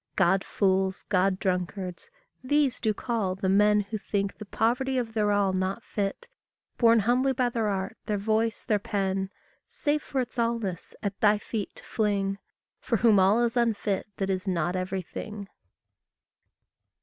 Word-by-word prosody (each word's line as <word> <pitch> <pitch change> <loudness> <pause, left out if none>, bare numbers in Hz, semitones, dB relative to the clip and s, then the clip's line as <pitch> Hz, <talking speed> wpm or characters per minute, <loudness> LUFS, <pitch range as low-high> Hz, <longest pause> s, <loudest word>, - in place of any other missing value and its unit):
God 190 0 +3
fools, 190 -1 0
God 190 -1 +2
drunkards 185 - -3 0.3
these 285 0 +2
do 220 - +1
call 210 -4 -1
the 190 0 -2
men 210 +2 +4
Who 210 +2 -5
think 200 0 -2
the 215 - -9
poverty 250 +6 0
of 230 -3 -2
their 210 -2 +2
all 200 -2 +2
not 190 +4 -1
fit, 205 - -3 0.5
Borne 230 -2 +6
humbly 250 +5 +2
by 250 -1 +1
their 230 -2 -1
art, 195 +1 -2
their 210 -2 0
voice, 220 +2 0
their 210 -2 +2
pen, 195 -1 -1 0.4
Save 300 0 -1
for 275 - -3
its 250 0 -3
allness, 230 -7 -2
at 200 -1 -3
thy 210 0 +5
feet 210 0 -5
to - - -12
fling, 200 -2 0 0.4
For 235 - 0
whom 215 -2 +5
all 200 +5 +4
is 235 0 0
unfit 220 -5 0
that 195 0 -1
is 185 +1 -3
not 175 -1 0
everything. 190 +3 -4
205 Hz, 160 wpm, -27 LUFS, 190-230 Hz, 0.5 s, Borne